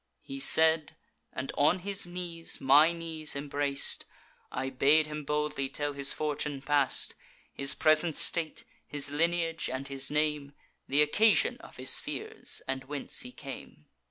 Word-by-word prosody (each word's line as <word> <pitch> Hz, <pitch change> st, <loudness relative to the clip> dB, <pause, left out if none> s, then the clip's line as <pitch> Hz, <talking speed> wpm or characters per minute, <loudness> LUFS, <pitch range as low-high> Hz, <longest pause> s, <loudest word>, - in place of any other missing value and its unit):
He 275 Hz, 0 st, -7 dB
said, 160 Hz, -, +3 dB, 0.4 s
and 130 Hz, +1 st, -5 dB
on 150 Hz, +5 st, +3 dB
his 195 Hz, 0 st, -3 dB
knees 175 Hz, -2 st, -3 dB
my 145 Hz, +5 st, +6 dB
knees 165 Hz, -3 st, -3 dB
embrac'd: 140 Hz, 0 st, 0 dB, 0.5 s
I 130 Hz, +1 st, -3 dB
bade 145 Hz, +4 st, +4 dB
him 150 Hz, 0 st, -6 dB
boldly 150 Hz, -2 st, -2 dB
tell 145 Hz, +1 st, -3 dB
his 140 Hz, 0 st, +2 dB
fortune 150 Hz, -2 st, -3 dB
past, 145 Hz, -2 st, +2 dB, 0.4 s
His 140 Hz, 0 st, +3 dB
present 155 Hz, +1 st, +3 dB
state, 165 Hz, -2 st, -1 dB, 0.2 s
his 145 Hz, -1 st, -1 dB
lineage, 165 Hz, +2 st, 0 dB
and 130 Hz, +1 st, -4 dB
his 135 Hz, -1 st, -3 dB
name, 150 Hz, -1 st, -1 dB, 0.4 s
Th' 145 Hz, +2 st, +4 dB
occasion 210 Hz, +9 st, +3 dB
of -, -, -14 dB
his -, -, +4 dB
fears, 440 Hz, 0 st, -3 dB
and 135 Hz, 0 st, -3 dB
whence 145 Hz, 0 st, -3 dB
he 250 Hz, -, -5 dB
came. 135 Hz, -, -10 dB
150 Hz, 145 wpm, -30 LUFS, 140-165 Hz, 0.5 s, my